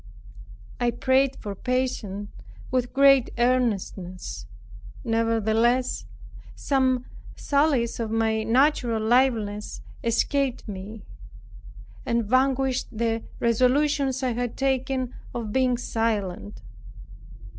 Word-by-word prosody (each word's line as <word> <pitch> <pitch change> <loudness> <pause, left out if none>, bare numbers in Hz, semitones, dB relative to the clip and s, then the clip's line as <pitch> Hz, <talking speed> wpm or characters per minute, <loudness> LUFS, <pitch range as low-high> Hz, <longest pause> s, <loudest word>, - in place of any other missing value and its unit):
I 245 - +2
prayed 265 +2 +2
for 205 - -6
patience 210 -4 -2 0.4
with 250 -1 0
great 275 -2 +5
earnestness; 190 - -1 0.6
nevertheless, 230 +2 +1 0.5
some 260 -2 +1 0.3
sallies 280 -6 +1
of 225 -2 -2
my 220 0 +1
natural 240 0 +2
liveliness 220 -3 +1 0.2
escaped 255 +3 0
me, 205 +2 -7 1.0
and 235 -2 0
vanquished 260 +2 +1
the 225 0 -1 0.2
resolutions 265 +3 +2
I 255 - +1
had 245 0 -3
taken 265 -1 -1 0.2
of 225 -3 -4
being 255 -2 +2
silent. 210 - -2
240 Hz, 90 wpm, -25 LUFS, 220-260 Hz, 1.0 s, great